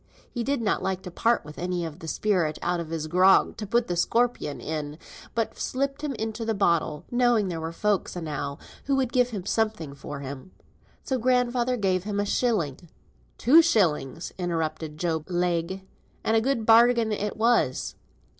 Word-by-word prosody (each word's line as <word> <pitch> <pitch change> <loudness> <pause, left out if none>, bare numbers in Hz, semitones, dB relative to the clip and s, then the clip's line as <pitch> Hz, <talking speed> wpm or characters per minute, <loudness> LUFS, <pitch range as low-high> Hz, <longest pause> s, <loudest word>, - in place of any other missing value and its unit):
He 240 - -3
did 275 -1 -1
not 210 - +1
like 190 -1 -2
to 180 - -7
part 230 0 +1
with 150 0 -10
any 180 -1 -2
of 160 +1 -7
the 165 - -8
spirit 175 -4 0
out 175 0 0
of 165 -2 -5
his 160 -1 -3
grog 185 +4 +4
to 210 - -5
put 235 +3 +2
the 175 - -2
scorpion 230 -4 0
in, 150 -1 -4 0.4
but 230 -1 -2
slipped 275 +2 -2
him 295 -3 -3
into 220 +1 -4
the 225 -1 -1
bottle, 170 -6 +1
knowing 240 -5 +3
there 165 -2 -4
were 160 +1 -4
folks 205 +3 -1
enow 145 -4 -4 0.3
who 275 - +1
would 260 -3 0
give 250 -1 +3
him 200 -6 -5
something 215 -11 -1
for 140 0 -7
him. 140 +6 -8 0.5
So 260 -2 -1
grandfather 250 0 +1
gives 190 -3 0
him 205 -1 -2
a 205 - +1
shilling." 175 - -1 0.5
"Two 300 +8 +7
shilling," 165 - +1 0.2
interrupted 160 -3 -2
Job 160 -2 -2
Legh, 175 +1 -1 0.4
"and 220 - +2
a 225 - +4
good 235 -2 0
bargain 230 0 +5
it 210 0 -2
was." 225 - +2
195 Hz, 180 wpm, -26 LUFS, 165-235 Hz, 0.5 s, Two